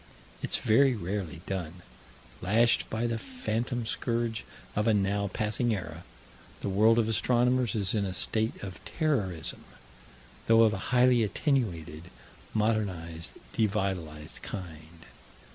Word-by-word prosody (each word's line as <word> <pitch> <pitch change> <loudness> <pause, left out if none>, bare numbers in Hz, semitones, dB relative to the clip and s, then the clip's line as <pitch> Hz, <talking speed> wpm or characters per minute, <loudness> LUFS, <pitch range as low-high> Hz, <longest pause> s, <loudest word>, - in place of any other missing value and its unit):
It's - - +1
very 130 +4 +4
rarely 95 -4 -4
done. 90 -2 -5 0.6
Lashed 115 +6 +3
by 110 +2 -1
the 115 -1 -1
phantom 120 - -3
scourge 115 0 -1 0.3
of 105 +2 +1
a 110 - +4
now 100 0 +1
passing 110 +3 0
era, 85 -3 -7 0.6
the - - -2
world 110 +4 +4
of 115 -2 +3
astronomers 125 +2 +2
is 100 -2 +1
in 105 -2 +1
a 95 - -2
state 110 +3 +1
of 95 -4 -8
terrorism, 105 - -1 0.8
though 115 0 +7
of 110 -1 +4
a - - -2
highly 125 -1 +5
attenuated, 90 - -1 0.4
modernized, 95 -7 -1 0.2
devitalized 95 -8 -2
kind. 80 -2 -8
105 Hz, 125 wpm, -29 LUFS, 90-115 Hz, 0.8 s, though